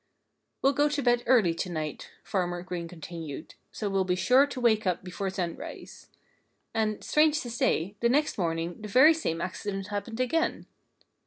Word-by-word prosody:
"We'll 275 Hz, +1 st, +4 dB
go 290 Hz, +2 st, +3 dB
to 290 Hz, -1 st, -1 dB
bed 240 Hz, -1 st, +3 dB
early 215 Hz, -10 st, +5 dB
to 175 Hz, +2 st, -3 dB
night," 155 Hz, -3 st, -4 dB
Farmer 175 Hz, -2 st, -2 dB
Green 180 Hz, -2 st, -5 dB
continued, 165 Hz, -3 st, -8 dB, 0.2 s
"so 210 Hz, -, -4 dB
we'll 195 Hz, -1 st, +1 dB
be 180 Hz, -1 st, 0 dB
sure 255 Hz, +9 st, +4 dB
to 275 Hz, -2 st, -6 dB
wake 220 Hz, -4 st, +3 dB
up 180 Hz, 0 st, 0 dB
before 190 Hz, +2 st, -4 dB
sunrise." 180 Hz, -3 st, -6 dB, 0.6 s
And, 215 Hz, -1 st, -1 dB
strange 305 Hz, 0 st, +3 dB
to 240 Hz, -, -6 dB
say, 200 Hz, -4 st, 0 dB
the 235 Hz, -, +2 dB
next 295 Hz, +5 st, +2 dB
morning 165 Hz, +1 st, -2 dB
the 215 Hz, -, -6 dB
very 265 Hz, +10 st, +7 dB
same 170 Hz, -, -2 dB
accident 195 Hz, +1 st, -4 dB
happened 215 Hz, +3 st, -4 dB
again. 320 Hz, +7 st, 0 dB
200 Hz, 170 wpm, -28 LUFS, 175-250 Hz, 0.6 s, very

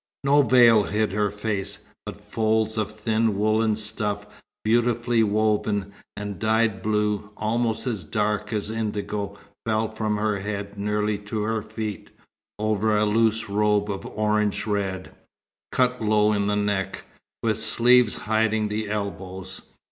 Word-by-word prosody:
No 140 Hz, +1 st, +5 dB
veil 120 Hz, -5 st, +6 dB
hid 105 Hz, 0 st, 0 dB
her 105 Hz, +1 st, +1 dB
face, 105 Hz, -1 st, -3 dB, 0.3 s
but -, -, -7 dB
folds 110 Hz, 0 st, 0 dB
of 105 Hz, -1 st, -1 dB
thin 110 Hz, 0 st, 0 dB
woollen 110 Hz, +1 st, +2 dB
stuff 105 Hz, -1 st, -1 dB, 0.4 s
beautifully 120 Hz, +1 st, +2 dB
woven, 105 Hz, -2 st, +1 dB, 0.2 s
and 100 Hz, -1 st, -5 dB
dyed 110 Hz, -2 st, +1 dB
blue, 105 Hz, 0 st, 0 dB
almost 115 Hz, 0 st, 0 dB
as 110 Hz, -7 st, -2 dB
dark 105 Hz, +5 st, -1 dB
as 105 Hz, -1 st, -2 dB
indigo, 105 Hz, -2 st, -3 dB, 0.3 s
fell 110 Hz, 0 st, 0 dB
from 110 Hz, -1 st, -1 dB
her 105 Hz, -1 st, 0 dB
head 100 Hz, 0 st, -5 dB
nearly 105 Hz, 0 st, -1 dB
to 105 Hz, +1 st, -4 dB
her 110 Hz, 0 st, -1 dB
feet, 105 Hz, -3 st, -6 dB, 0.5 s
over 110 Hz, 0 st, +1 dB
a 105 Hz, -, +3 dB
loose 110 Hz, +1 st, +2 dB
robe 105 Hz, 0 st, +1 dB
of 100 Hz, -, -5 dB
orange 105 Hz, -1 st, 0 dB
red, 95 Hz, -3 st, -2 dB, 0.6 s
cut 125 Hz, -1 st, +1 dB
low 105 Hz, 0 st, +3 dB
in 100 Hz, -1 st, 0 dB
the 105 Hz, -, +1 dB
neck, 100 Hz, -2 st, -1 dB, 0.4 s
with -, -, +1 dB
sleeves 125 Hz, -1 st, +5 dB
hiding 110 Hz, 0 st, +1 dB
the 105 Hz, 0 st, -3 dB
elbows. 95 Hz, -2 st, -5 dB
105 Hz, 140 wpm, -24 LUFS, 105-110 Hz, 0.6 s, veil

